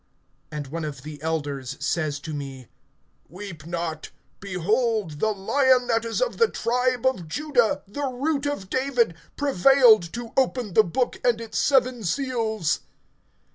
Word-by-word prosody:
(5)And 145 -3 -5
one 165 0 -3
of 150 -2 -6
the 150 -2 -9
elders 145 -5 -3
says 150 0 -1
to 160 0 -6
me: 135 -4 -7 0.6
Weep 175 -4 -9
not; 170 -2 -4 0.3
behold, 200 - 0
the 220 - +2
Lion 250 +5 +3
that 225 0 +2
is 230 - 0
of - - -3
the 460 - +5
tribe 250 +1 0
of 250 -11 +1
Judah, 260 - +1
the 280 +8 -3
Root 280 +3 -1
of 285 -10 -3
David, 250 -4 +1 0.2
prevailed 250 - +5
to 235 -1 -6
open 250 -6 +1
the 220 - +6
book, 245 +8 -1
and 240 -2 +3
its 225 -1 -3
seven 255 -4 +2
seals. 220 - 0
220 Hz, 145 wpm, -25 LUFS, 165-255 Hz, 0.6 s, the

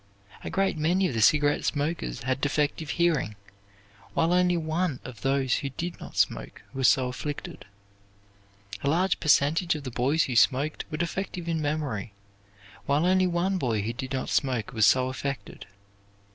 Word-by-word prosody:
A - - -4
great 195 -4 0
many 180 +5 +2
of 155 - -4
the 115 - 0
cigarette 145 +5 +4
smokers 145 - -2
had 130 +1 -1
defective 145 +1 0
hearing, 160 -11 +1 0.8
while 165 +2 +2
only 180 -1 +3
one 160 -2 -1
of 120 -5 -10
those 135 -1 +1
who 140 - -3
did 170 +6 -5
not - - -10
smoke - - -1
was 130 -1 +2
so 130 -3 +3
afflicted. 145 0 -6 1.2
A 140 - 0
large 180 +5 +2
percentage 160 +3 +3
of 150 - -6
the 130 - -5
boys 135 +7 +2
who 125 - -3
smoked 140 +5 +2
were 155 - -4
defective 175 +1 -3
in 165 -2 -1
memory, 145 -9 -2 0.7
while 145 +4 +2
only 185 0 +3
one 180 +2 0
boy 115 - 0
who 115 +3 -2
did 130 +3 -6
not 130 -1 -2
smoke 125 -4 0
was 110 -3 +4
so 130 +3 +4
affected. 135 -1 -5
145 Hz, 165 wpm, -27 LUFS, 130-170 Hz, 1.2 s, cigarette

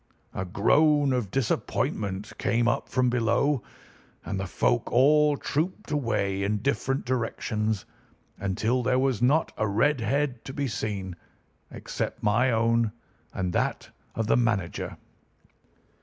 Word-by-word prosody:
A 95 - -3
groan 145 - +3
of 120 -6 -1
disappointment 105 -4 -2
came 120 0 +1
up 120 - 0
from 125 -1 +2
below, 125 +3 +2 0.6
and 100 - -3
the 95 - -3
folk - - 0
all 150 +3 +4
trooped 160 +4 -2
away 110 -9 0
in 105 +2 0
different 135 +3 -1
directions 110 -4 -1 0.5
until 110 +6 0
there 125 +1 +1
was 130 -3 +1
not 145 +6 +3
a 110 - +1
red 125 +7 +2
head 130 +1 -1
to 135 - -6
be 140 0 -1
seen 100 -5 -4 0.5
except - - -5
my 115 +5 +3
own 115 -1 +2 0.4
and 90 -1 -2
that - - -1 0.2
of 115 - -1
the 110 - +3
manager. 110 -8 -1
115 Hz, 130 wpm, -27 LUFS, 105-135 Hz, 0.6 s, all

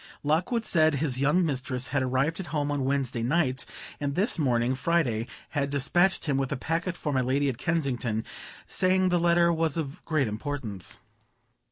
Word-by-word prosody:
Lockwood 180 - +1
said 155 -3 +4
his 135 -3 -1
young 150 +6 +3
mistress 130 -3 -2
had 140 0 0
arrived 130 +6 0
at 185 - -5
home 145 -2 -1
on 140 -2 -1
Wednesday 135 -3 -1
night, 130 0 0 0.3
and 140 -1 -2
this 190 -1 +2
morning, 125 -3 +2
Friday, 130 -7 0 0.2
had 140 -2 -1
despatched 155 +8 +2
him 140 -3 +1
with 135 -1 -1
a 140 - -1
packet 170 +6 -2
for 150 -4 -3
my 130 - +2
lady 135 +3 +1
at 120 - -5
Kensington, 130 -9 -1 0.4
saying 185 0 +2
the 175 -1 +2
letter 170 0 +4
was 160 -1 0
of 155 +1 -5
great 155 -5 +1
importance. 110 - -3
145 Hz, 175 wpm, -27 LUFS, 130-165 Hz, 0.4 s, said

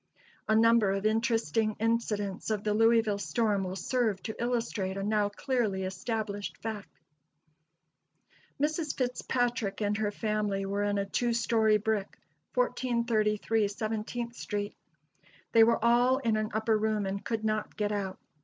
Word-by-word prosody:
A 220 - +3
number 230 -2 +5
of 195 +1 -2
interesting 225 -1 +1
incidents 215 -4 -1
of 210 -2 -1
the 210 - +1
Louisville 225 -1 +3
storm 210 -3 0
will 185 0 -4
serve 225 -2 0
to 220 - -4
illustrate 230 -5 -1
a 195 - -2
now 210 0 +1
clearly 215 -4 -1
established 205 +2 -3
fact. 215 -3 -5 1.7
Mrs. 305 +1 -1
Fitzpatrick 245 -4 -1
and 210 -1 0
her 215 -1 0
family 210 -2 -1
were 200 +1 -1
in 205 0 0
a 200 - 0
two 235 +4 0
story 220 -2 +3
brick, 210 -1 -2 0.4
1433 225 - +1
Seventeenth 220 +3 -4
street. 205 -2 -4 0.8
They 225 - +7
were 230 0 +3
all 245 +2 +4
in 230 -5 0
an 215 0 -1
upper 220 +1 +1
room 215 -1 0
and 195 +1 -3
could 220 -2 -2
not 215 -1 -1
get 210 -1 0
out. 195 -2 -3
215 Hz, 145 wpm, -30 LUFS, 205-230 Hz, 1.7 s, They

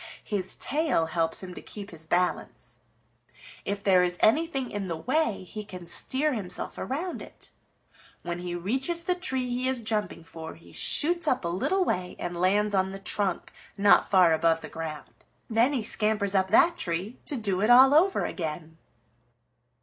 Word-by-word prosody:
His 190 -4 -3
tail 300 - 0
helps 165 +2 -1
him 180 -1 -7
to - - -9
keep 205 -1 -9
his 160 -1 -11
balance. 180 +2 -2 0.9
If 200 0 -3
there 185 -2 +5
is 180 0 -1
anything 270 +1 +2
in 200 -2 -4
the 165 -2 -3
way, 255 - 0
he 210 +3 -7
can 180 -4 -10
steer 265 - +2
himself 200 -7 -5
around 325 +8 -4
it. - - -11 0.7
When 175 0 -4
he 175 0 -4
reaches 265 - -2
the 360 - +1
tree 265 -9 -1
he 250 +1 -2
is 260 -1 +1
jumping 215 -6 -3
for 165 -1 -9
he 165 - -17
shoots 340 +1 +1
up 255 -10 +1
a - - 0
little 365 - 0
way 180 - -2
and 175 0 -5
lands 205 +3 +2
on 190 -1 +2
the 195 - -6
trunk 195 -1 -2 0.3
not 200 0 +5
far 180 -4 +5
above 165 0 +2
the - - -8
ground. 160 -2 -7 0.4
Then 230 +5 +3
he 260 -6 -1
scampers 210 -2 +1
up 190 -1 +2
that 325 - +4
tree 180 +7 -3
to 290 - -2
do 200 -5 -1
it 215 - +2
all 260 +3 +8
over 365 +6 +3
again." 160 -1 -5
200 Hz, 175 wpm, -27 LUFS, 175-260 Hz, 0.9 s, all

